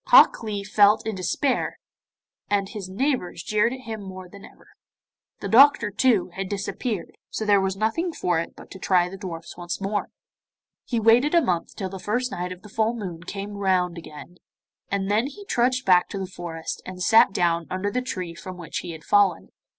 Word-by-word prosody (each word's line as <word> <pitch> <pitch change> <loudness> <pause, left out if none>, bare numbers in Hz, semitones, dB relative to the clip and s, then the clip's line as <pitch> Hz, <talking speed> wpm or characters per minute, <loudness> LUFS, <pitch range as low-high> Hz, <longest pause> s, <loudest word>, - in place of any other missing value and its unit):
Hok - - +7
Lee 210 -3 -3
felt 205 +1 +4
in 220 - -2
despair, 200 - -1 0.7
and 200 -1 +1
his 200 -5 -7
neighbours 200 - -1
jeered 215 +2 +2
at 260 0 -6
him 225 -4 -6
more 185 -1 -8
than 200 +2 -13
ever. - - -16 0.7
The - - -3
doctor, 235 -3 +6
too, 210 -3 +2
had 190 0 -4
disappeared, 205 -1 -3 0.2
so 220 - -3
there 205 -2 +4
was 190 0 -1
nothing 225 - 0
for 175 - 0
it 165 - -5
but - - -14
to 190 - -9
try 180 -1 +2
the 195 - -8
dwarfs 170 -5 -7
once 175 0 -4
more. 200 +1 -2 0.8
He 235 - -1
waited 235 +8 +4
a - - +8
month 175 -4 -1
till 190 -2 -4
the 190 0 -7
first 245 +6 -1
night 180 +1 -4
of 180 0 -9
the - - -11
full 220 +3 0
moon 180 -7 -6
came 200 +4 -6
round 180 -3 +1
again, 165 +1 -11 0.5
and 200 0 -1
then 220 +5 +2
he 400 +9 -10
trudged 255 -5 +1
back 180 -2 +5
to - - -5
the 190 - -3
forest, 170 -3 -6
and 185 0 -6
sat 220 -1 +6
down 170 -3 +1
under 185 +2 -2
the 250 - 0
tree 185 -9 -4
from 185 +1 -9
which 170 -2 -5
he 175 -2 -6
had 155 -1 -11
fallen. 200 -3 +3
195 Hz, 200 wpm, -24 LUFS, 180-225 Hz, 0.8 s, a